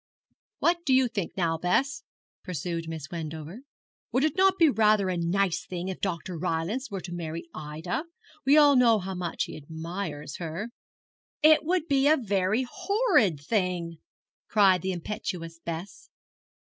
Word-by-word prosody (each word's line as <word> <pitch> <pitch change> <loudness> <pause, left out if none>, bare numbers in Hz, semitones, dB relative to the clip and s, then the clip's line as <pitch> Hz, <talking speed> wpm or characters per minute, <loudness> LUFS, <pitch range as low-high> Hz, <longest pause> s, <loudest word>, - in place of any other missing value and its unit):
'What 340 0 +1
do 265 -5 +3
you 260 -1 +4
think 200 -7 -4
now, 165 -3 0
Bess,' 260 - +1 0.4
pursued 170 -2 -4
Miss 155 -4 -7
Wendover; 160 +4 -6 0.5
'would 260 - +2
it 310 0 +1
not 385 +1 +4
be 330 - +6
rather 215 -6 +3
a 185 - 0
nice 175 +1 0
thing 180 0 -5
if 190 - -6
Dr. 175 -2 -3
Rylance 180 - -2
were 195 -3 -5
to 175 - -7
marry 170 -1 -5
Ida? 160 - -4 0.4
We 280 +3 +5
all 290 -2 +7
know 240 -3 +5
how 190 -1 -4
much 180 -2 -2
he - - -7
admires 160 0 -6
her.' 175 +7 -5 0.7
'It 310 0 +7
would 340 0 0
be 275 -1 +3
a 310 +2 +5
very 205 +1 0
horrid 360 - +2
thing!' 175 -1 -1 0.5
cried 195 -4 +4
the 190 - -1
impetuous 170 -2 -5
Bess. 170 - -7
185 Hz, 155 wpm, -27 LUFS, 165-255 Hz, 0.7 s, all